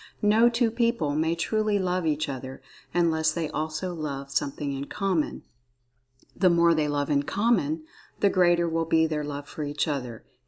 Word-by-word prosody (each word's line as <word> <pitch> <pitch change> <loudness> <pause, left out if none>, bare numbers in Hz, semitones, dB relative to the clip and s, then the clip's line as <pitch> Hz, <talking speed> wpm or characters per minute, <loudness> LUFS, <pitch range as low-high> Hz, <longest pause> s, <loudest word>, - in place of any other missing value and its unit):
No 220 +3 +5
two 235 -1 +1
people 230 - 0
may 160 +2 +1
truly 215 +4 0
love 180 -3 -1
each 155 0 0
other, 130 -1 -6 0.3
unless 160 -2 +2
they 160 -1 -3
also 155 +4 -3
love 140 -4 -5
something 140 +1 -2
in 135 +1 -4
common—the 185 -2 -2 1.1
more 170 -1 +4
they 155 -2 +1
love 145 0 -1
in 140 -1 +3
common, 165 -4 0 0.4
the 200 - +4
greater 175 -2 +3
will 165 0 0
be 160 0 +3
their 155 -2 -2
love 145 0 -6
for - - -8
each 145 +1 -1
other. 125 -6 -4
160 Hz, 165 wpm, -26 LUFS, 145-180 Hz, 1.1 s, No